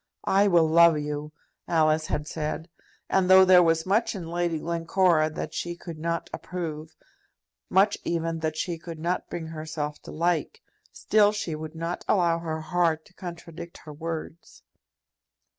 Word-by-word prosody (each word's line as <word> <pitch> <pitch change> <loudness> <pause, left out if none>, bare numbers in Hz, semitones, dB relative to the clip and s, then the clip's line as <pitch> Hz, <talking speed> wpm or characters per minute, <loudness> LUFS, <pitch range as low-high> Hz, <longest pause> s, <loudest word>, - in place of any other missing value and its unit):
"I 200 +1 +4
will 170 -4 +4
love 170 0 +6
you!" 150 0 -4 0.4
Alice 155 -1 +2
had 150 0 -2
said; 160 +1 -4 0.4
and 190 -1 +2
though 190 0 +8
there 185 -1 +7
was 165 -1 +2
much 210 +4 +1
in 175 -4 -6
Lady 170 -1 -1
Glencora 170 0 +2
that 155 - -6
she 175 0 -3
could 170 -2 -9
not 170 +1 -2
approve, 160 -3 -6 0.7
much 200 +2 +3
even 165 -1 -2
that 155 -1 -2
she 170 -1 -3
could 165 -1 -8
not 175 +3 -2
bring 170 -2 -5
herself 155 -2 -5
to - - -10
like, 165 -1 -1 0.3
still 210 -1 +3
she 210 -6 -3
would 155 +1 -7
not 165 +2 -4
allow 170 -4 +2
her 160 -1 -4
heart 160 0 0
to - - -21
contradict 170 -1 -9
her 150 - -8
words. 165 +1 -7
165 Hz, 160 wpm, -26 LUFS, 155-175 Hz, 0.7 s, though